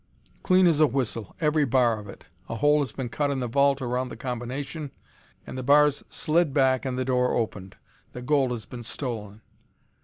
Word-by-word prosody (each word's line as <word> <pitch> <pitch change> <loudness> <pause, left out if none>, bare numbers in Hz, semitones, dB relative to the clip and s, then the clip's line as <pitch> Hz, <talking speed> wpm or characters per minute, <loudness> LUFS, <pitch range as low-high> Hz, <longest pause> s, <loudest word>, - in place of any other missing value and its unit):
"Clean 185 0 +4
as 165 -4 +3
a 155 - +7
whistle, 115 -5 -3
every 150 -1 +2
bar 125 -4 +2
of 105 -1 -11
it. - - -12 0.3
A - - -3
hole 145 +5 +3
has 140 -6 -1
been 130 -2 -5
cut 145 +4 -1
in 140 -1 -1
the 125 - -2
vault 140 +2 +2
around 125 +1 -2
the - - -9
combination, 135 +5 -5 0.6
and - - -8
the - - -2
bars 145 +2 +4
slid 155 -2 0
back 130 -1 +3
and 130 -1 -2
the 130 - -1
door 125 -1 +1
opened. 100 -5 -3 0.4
The 125 - -7
gold 135 -1 +2
has 120 -5 -5
been 120 +3 -9
stolen." 110 -4 -5
130 Hz, 195 wpm, -26 LUFS, 120-145 Hz, 0.6 s, a